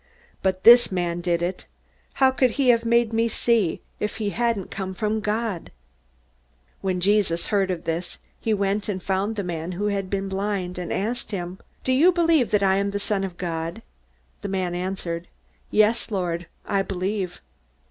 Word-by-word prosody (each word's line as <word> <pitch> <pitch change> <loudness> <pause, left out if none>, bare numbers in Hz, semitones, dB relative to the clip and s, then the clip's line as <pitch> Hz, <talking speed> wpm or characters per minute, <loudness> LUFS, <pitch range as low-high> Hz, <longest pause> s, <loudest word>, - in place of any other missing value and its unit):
But 185 -1 0
this 240 -1 +8
man 175 -2 -1
did 175 -1 0
it. 180 +1 -3 0.5
How 265 -1 +4
could 260 -1 +3
he 270 -3 +3
have 230 -1 +4
made 235 -1 +3
me 230 +1 +2
see, 220 -6 +1 0.2
if 210 - -2
he 210 -2 -2
hadn't 230 -5 -1
come 190 -1 -4
from 215 +1 0
God?" 210 -3 -2 1.1
When 185 -2 -1
Jesus 190 -3 +2
heard 195 -2 +3
of 180 -3 -2
this, 165 +2 -3 0.2
he 225 - -1
went 200 0 0
and 190 -3 -3
found 195 +3 0
the 200 - -2
man 170 0 -4
who 205 +4 -1
had 195 -2 -2
been 195 0 -1
blind, 195 -2 -2
and 175 - -4
asked 225 +5 -2
him, 185 -2 -5 0.2
"Do 260 - +2
you 320 +8 +6
believe 330 -7 +3
that 210 -1 +2
I 190 0 +4
am 200 0 +1
the 200 - -2
Son 200 -1 0
of 185 -3 -5
God?" 170 +4 -4 0.6
The 200 - -4
man 185 -2 -1
answered, 175 -2 -3 0.4
"Yes, 215 +3 +3
Lord, 175 -4 -2 0.2
I 200 -1 +1
believe." 190 0 -3
195 Hz, 180 wpm, -24 LUFS, 180-220 Hz, 1.1 s, this